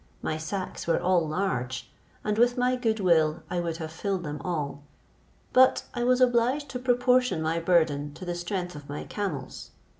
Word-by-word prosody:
My 155 - -1
sacks 185 +5 -5
were 165 - +3
all 180 -3 +2
large, 130 -8 -2 0.3
and 210 +1 0
with 245 +1 +4
my 250 +1 +2
good 225 -3 0
will 165 -4 +3
I 180 - 0
would 170 -2 -2
have 160 -2 -6
filled 190 +2 -2
them 150 -2 -5
all; 150 -5 -3 0.7
but 260 +1 +5
I 240 - -2
was 250 +1 +3
obliged 255 +3 +2
to 250 - -4
proportion 250 -3 +2
my 160 +1 0
burden 160 -4 +2
to 185 - -8
the 175 - -2
strength 175 +1 -3
of 145 -1 -10
my 145 - -4
camels. 155 -11 -5
180 Hz, 180 wpm, -27 LUFS, 160-240 Hz, 0.7 s, but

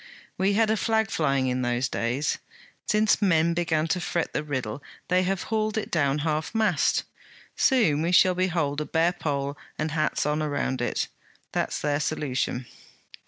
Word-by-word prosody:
We 195 +2 +1
had 220 +1 +3
a 220 - +2
flag 220 -1 +1
flying 135 -4 +1
in 125 0 0
those 120 +1 0
days. 125 +4 -1 0.5
Since 215 0 +3
men 170 -4 +3
began 165 -2 +1
to 180 - 0
fret 170 0 -2
the 150 - -1
riddle, 130 -4 -3 0.3
they 180 0 +4
have 185 0 -1
hauled 215 0 -1
it 220 - -3
down 140 -4 +2
half 155 +6 -1
mast. 220 -1 +2 0.5
Soon 215 - +3
we 170 +2 0
shall 185 0 +6
behold 165 -5 0
a - - -2
bare 165 +3 +2
pole 140 -3 -3 0.2
and 155 0 -2
hats 155 -2 0
on 150 +1 0
around 145 -4 -1
it. 120 - -1 0.4
That - - 0
is - - -4
their 145 -1 0
solution.' 135 -5 -2
155 Hz, 170 wpm, -26 LUFS, 140-185 Hz, 0.5 s, shall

